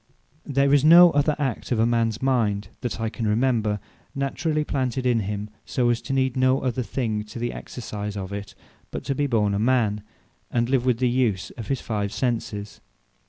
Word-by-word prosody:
There 140 0 +2
is 145 -1 +5
no 170 +2 +9
other 145 +1 +2
act 135 -6 -3
of 115 -1 +3
mans 115 -1 0
mind, 105 -7 +1
that 120 -3 -4
I 115 - -1
can 110 0 -3
remember, 110 -2 +1 0.4
naturally 150 +3 -1
planted 130 -3 -2
in 120 -2 +3
him, 105 0 -4
so, 120 -2 0
as 120 - -1
to - - -6
need 130 -2 +1
no 130 +1 +3
other 125 -1 -1
thing, 110 -3 -2
to 105 - -10
the 120 +1 -2
exercise 105 -3 -6
of 95 0 -5
it, 100 0 -6 0.3
but - - -6
to 140 - -1
be 145 +2 0
born 105 -5 +1
a 100 - 0
man, 110 -3 +2 0.5
and 120 0 0
live 130 -2 +1
with 125 -3 +3
the 125 +1 +1
use 120 -6 0
of 115 - -8
his 135 -2 -1
five 105 -3 -2
Senses. 110 -5 -3
120 Hz, 195 wpm, -24 LUFS, 105-130 Hz, 0.5 s, no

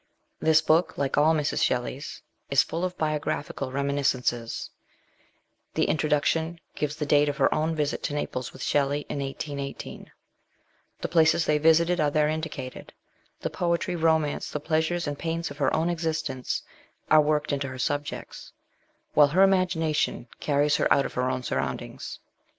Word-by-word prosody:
This 160 0 +4
book, 160 +3 +2
like 140 -1 0
all 155 +2 +4
Mrs. 150 -2 0
Shelley's, 130 +4 -2 0.3
is 140 - +5
full 165 +2 -4
of 185 0 -2
biographi 155 -1 -2
cal 135 -2 -4
reminiscences; 135 -4 -1 1.0
the - - +2
introduction 160 +2 +1
gives 150 0 -2
the 150 -1 -3
date 145 0 +4
of 145 - -3
her 135 - +3
own 160 +1 0
visit 150 -1 -1
to 145 - -2
Naples 130 -3 -3
with - - -9
Shelley, 145 +1 +1
in 145 - -3
1818; 140 0 -6 0.9
the - - -1
places 165 0 +4
they 150 0 +2
visited 165 +3 +4
are 150 -1 +3
there 150 +1 +2
indicated; 155 -5 -5 0.5
the - - -2
poetry, 170 0 0
romance, 160 -3 +1
the 150 - -3
pleasures 160 +3 0
and 145 -1 -4
pains 165 -1 -2
of 145 - -10
her 135 -2 +2
own 160 +1 +1
existence, 155 -6 -2 0.5
are 155 0 +8
worked 150 0 0
into 140 -1 -1
her 130 -1 -7
subjects; 145 +3 -4 0.6
while 150 -1 +7
her 180 +7 +4
imagination 175 -9 +1
carries 145 +1 +2
her - - +1
out 140 - +4
of - - -5
her 125 +1 0
own 130 - -2
surroundings. - - -4
150 Hz, 160 wpm, -26 LUFS, 140-160 Hz, 1.0 s, are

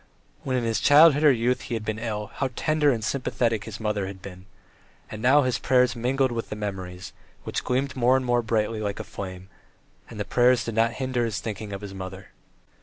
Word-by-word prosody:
When 130 -1 -1
in 120 - -1
his 115 -1 0
childhood 150 +1 +6
or 150 - +7
youth 125 0 0
he 120 - -4
had 110 -1 -5
been 110 0 -3
ill, 105 -2 -4
how 135 - -2
tender 155 -1 +2
and 115 -4 -2
sympathetic 115 -3 -1
his 110 -2 -8
mother 105 -3 -1
had 95 0 -8
been! 95 0 -11 0.6
And 110 - -7
now 140 +4 +5
his 125 -2 0
prayers 125 -1 +3
mingled 130 +2 0
with 115 -1 -4
the - - -4
memories, 95 -3 -6 0.3
which - - -3
gleamed 130 +1 -1
more 130 +1 +4
and 130 - -3
more 120 0 +2
brightly 110 -1 -1
like 100 -2 -3
a - - -4
flame, 95 -1 -8 0.6
and 110 - -9
the 105 - -2
prayers 125 +1 +3
did 115 - -4
not 115 +1 +2
hinder 130 -2 -1
his 110 -3 -2
thinking 105 -1 -6
of 100 0 -6
his 100 -2 -8
mother. 95 0 -8
115 Hz, 215 wpm, -25 LUFS, 105-125 Hz, 0.6 s, or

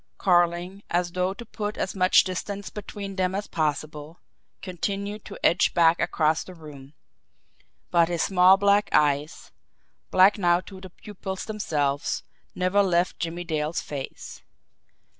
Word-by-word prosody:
Carling, 175 +1 +1
as 175 0 0
though 185 +1 -1
to 235 - -9
put 210 -1 -5
as - - -2
much 185 -1 +5
distance 200 +2 -5
between 200 -1 -7
them 185 0 0
as 205 +1 -3
possible, 155 0 -3 0.4
continued 200 +3 -4
to 200 - -9
edge 175 - +3
back 170 0 +4
across 155 0 +1
the 185 - -12
room 150 -3 -13 1.0
but 170 -1 +4
his 170 -2 0
small 185 0 +5
black 200 +1 +3
eyes, 150 +1 +1 0.6
black 190 +3 +5
now 175 -2 +3
to 190 +1 -12
the 190 - -10
pupils 190 0 -7
themselves, 145 -10 -2 0.3
never 185 +2 +2
left 180 -2 +1
Jimmie 170 +1 -4
Dale's 155 -1 -2
face. 140 -2 -8
180 Hz, 140 wpm, -25 LUFS, 165-195 Hz, 1.0 s, much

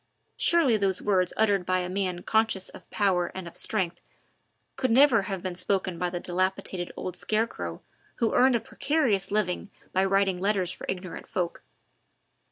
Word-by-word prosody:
Surely 320 -10 +4
those 195 -3 +1
words 185 -3 +2
uttered 205 -4 +3
by 185 +1 +1
a 180 -1 -1
man 185 -1 -2
conscious 220 -4 +1
of - - -14
power 185 -4 +1
and 190 -2 -5
of 170 - -10
strength 180 -5 -1 0.7
could 260 -1 0
never 250 -1 +6
have 190 -1 -4
been 185 -1 -3
spoken 185 -1 -1
by 180 - 0
the 175 0 -4
dilapidated 185 0 -1
old 180 - -4
scarecrow 220 +2 -2 0.3
who 230 -3 0
earned 255 0 +5
a - - +2
precarious 235 -10 0
living 200 -2 -1 0.2
by 190 - +3
writing 195 -1 +2
letters 190 -2 +1
for - - -8
ignorant 185 -1 -5
folk. 175 -2 -3
190 Hz, 165 wpm, -27 LUFS, 180-215 Hz, 0.7 s, never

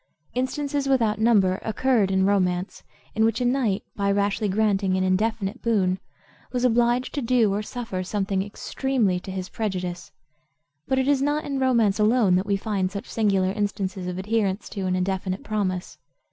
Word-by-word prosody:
Instances 275 +2 -1
without 225 -5 +2
number 200 -5 +3
occur 230 0 +2
in 190 0 +1
romance, 185 -2 0 0.3
in 220 - +1
which 225 +1 +2
a 250 - 0
knight, 245 -6 +1
by 200 0 +1
rashly 200 +1 0
granting 195 -2 +1
an 185 - +1
indefinite 200 +3 0
boon, 190 -5 +1 0.5
was 250 -1 0
obliged 240 +1 +2
to 285 - -2
do 230 -4 +2
or 205 - -1
suffer 215 -4 -5
something 195 0 -1
extremely 205 0 -1
to 185 - -10
his 185 -1 -4
prejudice. 180 -5 -4 0.8
But 265 - +1
it 265 0 +1
is 285 -2 +3
not 295 +2 0
in 275 -1 -2
romance 235 -6 +2
alone 215 -2 +4
that 190 +2 -2
we 200 -1 +2
find 195 -2 -1
such 200 +4 -5
singular 195 -4 +2
instances 195 -2 -3
of 180 0 -4
adherence 200 0 -1
to 195 -3 -3
an 185 - +1
indefinite 185 +1 -2
promise. 190 -4 -3
205 Hz, 170 wpm, -24 LUFS, 190-235 Hz, 0.8 s, alone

